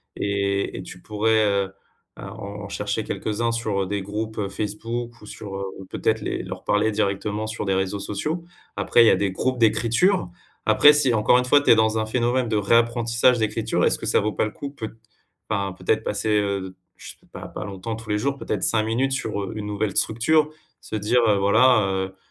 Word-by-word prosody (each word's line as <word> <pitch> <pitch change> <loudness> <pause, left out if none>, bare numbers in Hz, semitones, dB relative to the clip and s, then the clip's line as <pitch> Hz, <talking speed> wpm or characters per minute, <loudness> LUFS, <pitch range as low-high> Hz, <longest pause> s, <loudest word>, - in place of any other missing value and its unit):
et 100 0 -1
et 90 - -6
tu 90 - -11
pourrais, 110 +3 +1
heu, 100 -1 0 0.4
à - - -9
en 100 0 -7
chercher 105 +2 -2
quelques-uns 110 +2 -2
sur, 110 -4 -1
heu, - - -3
des 100 0 -2
groupes, 110 +3 -5
heu, 100 -2 -1
Facebook 115 +4 -5
ou - - -12
sur, 100 -2 -8
heu, 100 - -4 0.2
peut-être - - 0
les - - -3
leur - - -7
parler 105 +2 +2
directement 105 +1 -1
sur 110 -1 -4
des 95 - +1
réseaux 95 +1 -1
sociaux. 155 - -3 0.3
Après, 120 - +4
il 115 - +5
y - - +8
a - - +5
des 100 -2 0
groupes 130 +6 -1
d'écriture. 115 - +2 0.4
Après, 150 0 +7
si, 140 -5 +2
encore 110 +3 +4
une 125 - +2
fois, 145 +3 +5
tu 145 - -1
es - - +8
dans 110 0 +2
un 110 - 0
phénomène 120 +2 0
de 110 - -1
réapprentissage 115 +3 +3
d'écriture, 110 0 0
est-ce - - +2
que - - -6
ça - - +2
vaut 105 +1 -1
pas 105 - 0
le 110 - -4
coup, 140 +6 -7
peut 115 -5 -7 0.5
enfin, 100 -3 -1
peut-être, - - 0
passer, 110 - -2
heu, 100 -3 0 0.2
je - - -11
sais - - -27
pas, - - -7
pas - - -6
longtemps, 100 +3 -5
tous 115 -1 -11
les 105 - +1
jours 140 +5 -1
peut-être 105 -7 -3
5 110 -1 +2
minutes 125 +5 0
sur, 110 -6 -2
heu, 95 - -5
une 105 - -4
nouvelle 105 -1 -2
structure, 150 +7 +2 0.3
se - - -6
dire 110 +4 +2
heu, 105 - +4
voilà, 110 +4 +5
heu: 95 0 -3
110 Hz, 215 wpm, -23 LUFS, 100-115 Hz, 0.5 s, y